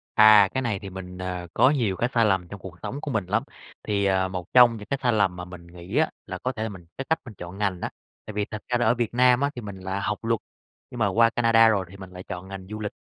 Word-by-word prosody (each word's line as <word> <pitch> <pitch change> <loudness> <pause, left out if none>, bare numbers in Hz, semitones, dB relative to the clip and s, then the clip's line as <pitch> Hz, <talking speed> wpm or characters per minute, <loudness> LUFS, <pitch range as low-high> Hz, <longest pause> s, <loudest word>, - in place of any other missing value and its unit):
À, 105 -2 +8
cái 130 - 0
này 110 -6 -1
thì 100 -2 -8
mình, 90 -1 -8
ờ, 90 -1 -5
có 130 - +5
nhiều 115 -10 +1
cái 120 - 0
sai 115 -2 +4
lầm 95 -4 +1
trong 100 +2 -9
cuộc 90 -1 -10
sống 130 +8 -5
của 145 - -4
mình 105 -5 -1
lắm, 110 +5 0 0.4
thì, 100 -1 0
à, 95 -1 +2
một 90 -1 -7
trong 120 -2 +7
những 105 - -10
cái 140 - -1
sai 120 -2 +3
lầm 100 -4 +2
mà 90 0 -6
mình 90 -1 -12
nghĩ 90 +7 -6
á, 160 - +3 0.2
là - - -5
có 130 - -2
thể 110 -3 -5
là 110 - -2
mình 95 -4 -11
cái 135 - -4
cách 160 - +2
mình 115 - -9
chọn 90 +2 -8
ngành 100 -4 -1
á. - - -2 0.4
Tại 110 - -7
vì 105 0 -1
thật 110 -1 -5
ra 125 - +1
là 120 - +1
ở - - +4
Việt 120 -2 -2
Nam 125 +1 +4
á 140 - +2
thì 120 - -6
mình 100 -2 -8
là 95 +1 -3
học 100 +1 -2
luật, 115 -1 +1 0.5
nhưng - - -7
mà - - +3
qua 115 0 +4
Canada 115 -1 +4
rồi 100 -4 +2
thì 100 - -12
mình 95 -1 -10
lại 90 0 -9
chọn 90 +1 -7
ngành 95 -1 -8
du 105 0 -6
lịch. 105 -1 -3
105 Hz, 305 wpm, -25 LUFS, 95-115 Hz, 0.5 s, À